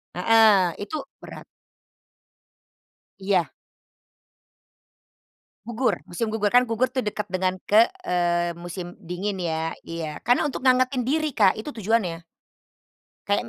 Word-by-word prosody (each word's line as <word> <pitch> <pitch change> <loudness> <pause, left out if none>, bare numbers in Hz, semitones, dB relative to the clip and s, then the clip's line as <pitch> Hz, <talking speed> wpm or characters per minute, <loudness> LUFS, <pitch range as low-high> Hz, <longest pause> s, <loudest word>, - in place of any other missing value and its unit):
Heeh, 200 -2 +4
itu 260 - -6 0.3
berat. - - -10 1.7
Iya. 190 -6 0 2.2
Gugur, 240 +2 -1
musim 175 +6 -2
gugur 210 -2 +1
kan 245 +3 +5
gugur 230 +2 0
tuh 255 -3 -3
dekat 210 0 -4
dengan 185 0 0 0.2
ke 220 +3 +7 0.2
eee, 175 -1 0
musim 175 +1 -8
dingin 190 +4 -4
ya, 160 -2 -2 0.2
iya. 160 -2 -5
Karena 245 +2 +3
untuk 265 - -6
ngangetin 255 -1 +3
diri, 310 +4 0
Kak, 195 -3 +5
itu 220 +7 -7
tujuannya. 205 - -1 1.0
Kayak 205 +3 +1
200 Hz, 115 wpm, -24 LUFS, 175-230 Hz, 2.2 s, ke